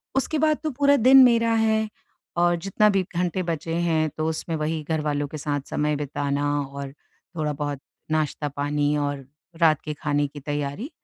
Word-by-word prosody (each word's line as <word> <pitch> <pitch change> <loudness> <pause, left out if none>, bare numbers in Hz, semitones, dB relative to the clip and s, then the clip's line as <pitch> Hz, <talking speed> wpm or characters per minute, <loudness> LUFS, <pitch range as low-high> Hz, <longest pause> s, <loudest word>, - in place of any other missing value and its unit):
उसके 275 +3 0
बाद 310 0 +3
तो 310 - 0
पूरा 285 +2 +4
दिन 260 +2 +8
मेरा 230 -2 +4
है। 220 -1 +2 0.5
और 175 0 +3
जितना 195 +4 +2
भी 195 -2 +2
घंटे 180 +1 0
बचे 165 -1 -3
हैं 165 -2 +1
तो 155 - -1
उसमें 160 +1 -3
वही 155 +1 -2
घरवालों 150 -2 -1
के 155 - -7
साथ 145 -1 -2
समय 150 0 0
बिताना 145 0 -2
और 140 0 -6 0.4
थोड़ा 155 -2 -1
बहुत 145 -1 -3 0.3
नाश्ता-पानी 145 -1 0
और 145 -2 -2 0.4
रात 155 -3 +4
के 150 - -4
खाने 145 0 0
की 145 +1 -10
तैयारी 145 - -4
155 Hz, 170 wpm, -24 LUFS, 145-190 Hz, 0.5 s, दिन